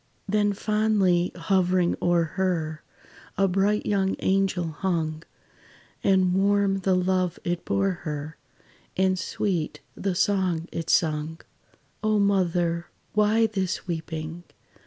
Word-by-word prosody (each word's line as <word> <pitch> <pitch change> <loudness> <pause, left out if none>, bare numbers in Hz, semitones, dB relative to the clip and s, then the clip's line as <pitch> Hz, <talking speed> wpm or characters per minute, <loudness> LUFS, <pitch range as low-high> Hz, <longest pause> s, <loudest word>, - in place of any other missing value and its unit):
Then, 205 0 +2
fondly 205 -4 +2
hovering 180 0 +2
o'er 175 -1 +3
her, 165 -2 -2 0.6
A 195 +1 +3
bright 195 +3 +1
young 195 -2 +1
angel 190 -3 +1
hung; 160 -2 -2 0.8
And 190 -2 +3
warm 200 0 +2
the 190 0 +2
love 180 -1 +1
it 175 0 -2
bore 195 0 +1
her, 150 0 -5 0.6
And 185 0 +2
sweet 180 -6 -2
the 195 -2 -2
song 180 -4 +1
it 165 -1 -4
sung: 155 0 +1 0.6
"O 215 0 +2
mother, 175 -4 +1 0.3
why 215 +2 +3
this 190 -4 -2
weeping? 160 -1 -5
185 Hz, 115 wpm, -25 LUFS, 170-195 Hz, 0.8 s, o'er